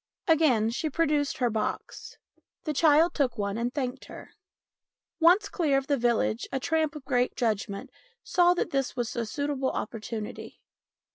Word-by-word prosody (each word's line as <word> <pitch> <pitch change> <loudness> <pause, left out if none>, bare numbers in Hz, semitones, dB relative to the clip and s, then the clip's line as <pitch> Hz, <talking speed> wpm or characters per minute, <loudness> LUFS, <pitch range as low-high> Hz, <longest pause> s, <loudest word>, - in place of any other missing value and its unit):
Again 275 -10 +3
she 310 +6 -2
produced 295 -2 0
her 245 -2 +1
box. 215 0 -4 0.5
The 305 - -2
child 320 +3 +4
took 260 -5 0
one 200 -1 -2
and 235 +2 -1
thanked 260 -2 -4
her. - - -11 0.9
Once 360 +5 +5
clear 300 -6 +1
of 270 - -1
the 285 - +1
village 235 -2 0
a 270 - -1
tramp 315 +2 0
of 290 -3 -9
great 250 -2 +1
judgment 210 -3 -2 0.3
saw 355 0 +3
that - - -2
this 270 -2 -1
was 240 -1 -3
a 235 -1 -2
suitable 280 +2 -1
opportunity. 215 0 -6
270 Hz, 155 wpm, -27 LUFS, 235-310 Hz, 0.9 s, Once